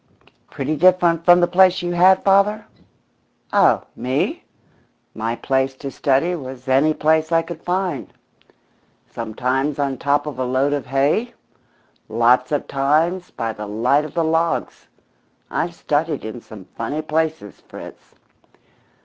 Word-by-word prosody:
"Pretty 155 - -3
different 175 0 +3
from 175 0 +6
the 175 - +4
place 185 0 +4
you 175 - -2
had, 185 +2 +4
father?" 200 +2 +3 0.9
"Oh - - +4
me? 130 +2 -2 0.7
My 115 +1 -3
place 135 +1 -1
to 135 +1 -7
study 140 +7 +1
was 130 -5 -8
any 135 +4 +3
place 155 +1 +1
I 165 0 +3
could 165 -1 -9
find. 180 -5 -2 1.0
Sometimes 130 +6 -2
on 140 -3 -2
top 145 +1 +1
of 150 -4 -6
a - - 0
load 130 +3 0
of 145 -3 -3
hay, 145 - 0 0.7
lots 120 +4 +2
of 145 - -1
times 155 +7 0
by 115 -1 -4
the 105 -1 -7
light 115 +8 +1
of 150 - -9
the 170 - +1
logs. 165 +1 -1 0.6
I've 170 0 -2
studied 155 -2 -1
in 110 +2 -7
some 105 -5 -12
funny 145 +7 -3
places, 155 - -3
Fritz." - - -12
150 Hz, 140 wpm, -20 LUFS, 130-170 Hz, 1.0 s, from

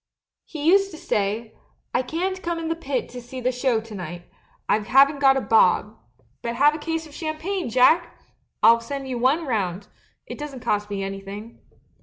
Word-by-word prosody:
He 305 -2 -6
used 390 +4 +5
to 320 - -10
say, 215 -1 -2 0.4
"I - - +2
can't 365 +8 -3
come 340 -1 -2
in 325 -1 -4
the 330 - 0
pit 275 -6 -3
to 245 0 -8
see 245 +2 -8
the 255 +1 0
show 250 -2 +1
to 225 -1 -12
night 175 -2 -7 0.3
— - - -37
I 210 - +3
haven't 275 +6 +4
got 270 -1 +5
a - - 0
bob; 215 -1 +3 0.5
but 235 0 -3
have 290 +4 +5
a 310 - -5
case 325 +1 -3
of 305 - -14
champagne. 325 +2 -3
Jack! 285 +9 +3 0.5
I'll 230 0 +7
send 275 +3 -5
you 250 -2 -3
one 280 +7 +2
round 200 -6 -2 0.2
— - - -42
it - - -8
doesn't 285 -4 -7
cost 210 -1 -1
me 200 -1 -3
anything." 195 +3 -7
255 Hz, 200 wpm, -24 LUFS, 220-310 Hz, 0.5 s, I'll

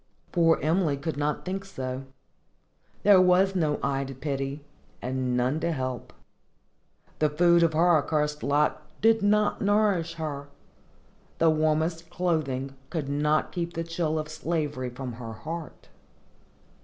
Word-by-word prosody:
Poor 165 -2 +4
Emily 160 -2 +2
could 155 +3 -3
not 145 +1 -2
think 190 +1 -3
so. 130 -8 -5 1.0
There 200 -3 +7
was 185 +2 +4
no 155 -5 +1
eye 140 0 0
to 135 0 -8
pity, 135 +1 -3 0.4
and 125 -1 -1
none 130 +5 +1
to 170 +1 0
help. 130 -4 -4 1.1
The 155 - +3
food 170 +3 +4
of 165 -1 +3
her 170 +1 +5
accursed 150 0 -1
lot 150 +2 +1 0.2
did 225 +1 +4
not 210 +1 +2
nourish 200 -5 +2
her; 145 -3 -5 0.9
the 165 -1 +4
warmest 160 +2 0
clothing 150 -7 -1 0.2
could 155 -5 -3
not 150 +2 +1
keep 170 -1 -3
the 165 - -2
chill 165 -1 -1
of 155 -1 -3
slavery 155 -4 -2
from 125 0 -6
her 115 -1 -7
heart. 160 +6 -8
155 Hz, 140 wpm, -27 LUFS, 140-170 Hz, 1.1 s, There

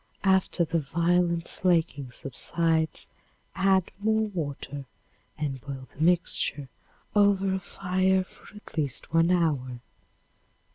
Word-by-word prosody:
After 190 -2 +3
the 165 +1 0
violent 170 +3 +1
slaking 165 -7 +1
subsides 160 +6 0 0.5
add 190 -1 +2
more 220 +1 +2
water 145 -5 -5 0.5
and 140 -4 -3
boil 135 -1 -8
the 150 - -8
mixture 165 -5 +1 0.5
over 200 -2 +4
a 190 - 0
fire 185 0 +1
for 185 - -17
at 210 - -13
least 145 -1 -2
one 165 +1 +4
hour. 145 -9 +1
170 Hz, 110 wpm, -27 LUFS, 145-190 Hz, 0.5 s, over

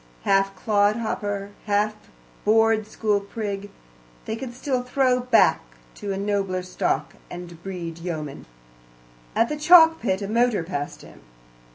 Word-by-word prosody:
Half 195 0 +2
clodhopper, 205 -1 0 0.2
half 210 +1 +2 0.5
board 225 0 +3
school 210 -2 0
prig, 200 -1 -5 0.6
they 220 - -3
can 250 +1 -6
still 255 +1 -2
throw 250 0 +2
back 250 -2 +4 0.3
to 205 - -5
a 195 - -2
nobler 195 -2 -1
stock, 150 -5 -2 0.2
and 175 -1 -9
breed 170 -3 -6
yeomen. 155 -5 -6 0.9
At 230 - +3
the 300 - -3
chalk 325 +1 +7
pit 195 -3 -1
a - - -3
motor 230 -3 +2
passed 145 -4 -5
him. - - -15
205 Hz, 135 wpm, -24 LUFS, 190-230 Hz, 0.9 s, chalk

